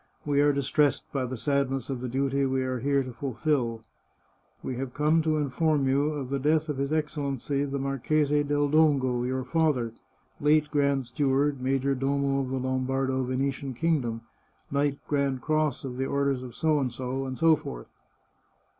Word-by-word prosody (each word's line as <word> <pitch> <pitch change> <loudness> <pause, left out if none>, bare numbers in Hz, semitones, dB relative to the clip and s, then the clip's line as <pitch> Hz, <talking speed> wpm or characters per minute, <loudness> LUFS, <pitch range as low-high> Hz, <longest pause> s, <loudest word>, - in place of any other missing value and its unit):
" - - -36
We 145 -1 +2
are 145 0 +5
distressed 140 +1 +1
by 135 -2 0
the 130 0 -5
sadness 135 -1 0
of 130 -2 -4
the 125 - -3
duty 135 +2 0
we 130 0 0
are 130 -1 -2
here 140 +2 +1
to 130 -1 -7
fulfil. 125 -3 -1 0.8
We 130 - -3
have 130 -1 -5
come 155 +2 +3
to 155 -1 +1
inform 145 0 +1
you 140 +3 +2
of 135 -3 -5
the 140 - 0
death 155 +3 +1
of 145 - -2
His 140 +1 -1
Excellency, 145 -3 -1
the 140 0 -3
Marchese 145 +2 +1
del 145 0 +1
Dongo, 140 -5 +3
your 130 0 -1
father, 130 -5 +1 0.5
late 150 +1 +3
Grand 140 -2 +1
Steward, 140 +2 0
Major 135 +1 +1
Domo 140 +1 0
of 130 - -4
the 135 - -2
Lombardo 130 +1 0
Venetian 130 +1 -2
Kingdom, 130 -8 0 0.5
Knight 140 0 +1
Grand 140 -3 0
Cross 155 -3 0
of 125 -2 -5
the 135 +1 -1
Orders 140 -2 0
of, 125 -2 -9 0.2
and 130 -3 -1
so 130 +5 +1
forth." - - -8
140 Hz, 170 wpm, -27 LUFS, 130-145 Hz, 0.8 s, are